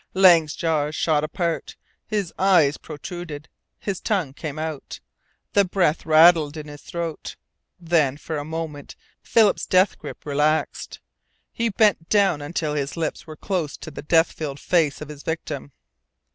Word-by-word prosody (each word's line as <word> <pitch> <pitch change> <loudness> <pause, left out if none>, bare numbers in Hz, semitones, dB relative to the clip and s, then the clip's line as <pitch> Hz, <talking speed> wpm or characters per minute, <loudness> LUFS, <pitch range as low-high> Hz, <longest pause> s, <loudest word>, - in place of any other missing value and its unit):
Lang's 170 -5 +6
jaws 155 -2 0
shot 150 -2 +1
apart, 165 +1 -2 0.3
his 205 -5 -2
eyes 175 -7 +4
protruded, 160 -1 -8 0.3
his 195 -3 -4
tongue 185 -11 -1
came 150 0 -6
out 155 -2 -5 0.5
the 200 - +5
breath 175 -5 0
rattled 160 -1 +6
in 150 -1 -7
his 145 -1 -10
throat. 170 -2 -5 0.4
Then 160 -6 +1
for 155 +1 -5
a - - -4
moment 155 -2 -6 0.3
Philip's 220 -3 +3
death 185 +1 +3
grip - - -9
relaxed. 150 +2 0 0.5
He 230 0 -1
bent 205 -6 +2
down 200 -8 +3
until 150 0 -2
his 145 +1 -3
lips 165 0 -3
were 155 - -8
close 170 -6 -2
to 160 - -9
the - - -7
death 165 +2 +3
filled 145 -3 -5
face 160 -2 +1
of 150 - -7
his 150 -1 -9
victim. 150 -3 -5
160 Hz, 150 wpm, -23 LUFS, 150-175 Hz, 0.5 s, Lang's